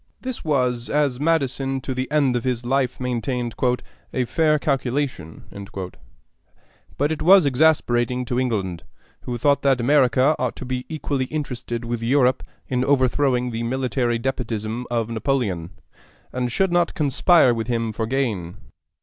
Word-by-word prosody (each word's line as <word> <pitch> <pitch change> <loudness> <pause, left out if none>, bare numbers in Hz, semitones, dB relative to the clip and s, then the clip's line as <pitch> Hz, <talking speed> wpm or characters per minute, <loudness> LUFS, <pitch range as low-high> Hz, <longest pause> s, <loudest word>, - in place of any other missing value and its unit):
This 255 -2 -5
was, 125 -5 0
as 145 -4 +1
Madison 135 -4 0
to 130 0 -4
the 130 +1 -3
end 140 -4 +2
of 120 - -1
his 125 -2 -2
life 130 0 0
maintained, 125 -1 -2 0.6
"a 130 - 0
fair 155 +4 +2
calculation;" 135 - -2 1.5
but 145 +2 +1
it 160 - -3
was 185 -1 +7
exasperating 125 -4 +2
to 125 +1 -1
England, 100 -9 -2 0.4
who 120 -1 -3
thought 140 +4 +2
that 135 -2 +3
America 130 +2 +3
ought 125 -2 -1
to - - -7
be 125 0 -4
equally 145 -4 -2
interested 125 -5 -4
with 120 0 -3
Europe 130 +1 +2 0.3
in 125 -1 0
overthrowing 130 -2 +2
the 115 0 -3
military 125 0 0
despotism 115 -2 -3
of 115 -2 -1
Napoleon, 110 - -1 0.6
and 125 -1 -2
should 190 +8 +1
not 175 0 +1
conspire 145 -1 +4
with 115 -1 -3
him 115 -2 -1
for 110 +1 -3
gain. 110 -10 -2
125 Hz, 145 wpm, -22 LUFS, 120-140 Hz, 1.5 s, was